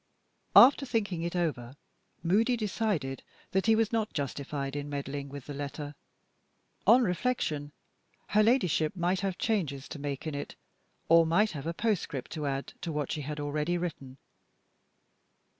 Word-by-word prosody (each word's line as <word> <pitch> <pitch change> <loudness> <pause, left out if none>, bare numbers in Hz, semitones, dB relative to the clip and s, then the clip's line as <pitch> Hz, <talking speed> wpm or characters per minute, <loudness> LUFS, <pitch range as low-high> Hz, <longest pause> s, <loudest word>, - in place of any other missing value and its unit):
After 275 +3 +9
thinking 205 -9 -1
it 170 +1 -3
over, 140 -8 -2 0.5
Moody 225 +8 +3
decided 200 - -1 0.3
that 190 +3 +1
he 225 - +6
was 225 0 +1
not 220 -2 0
justified 140 -1 -3
in 145 0 -4
meddling 140 0 -4
with 140 -2 -8
the 145 - -6
letter. 145 +1 -5 0.9
On 245 +4 +7
reflection, 180 - -1 0.6
her 215 - +4
Ladyship 200 - +2
might 180 +1 +1
have 190 -1 -2
changes 155 - -1
to 150 - -7
make 140 0 -4
in 155 - -3
it 145 - -5 0.5
or 165 0 +7
might 205 +6 +3
have 150 -2 -6
a 165 - -1
postscript 180 - -1
to 150 -3 -3
add 135 0 -3
to 170 - -3
what 150 -2 -2
she 150 - -2
had 150 +1 -5
already 150 +4 -1
written. 145 -7 -5
160 Hz, 155 wpm, -30 LUFS, 145-205 Hz, 0.9 s, After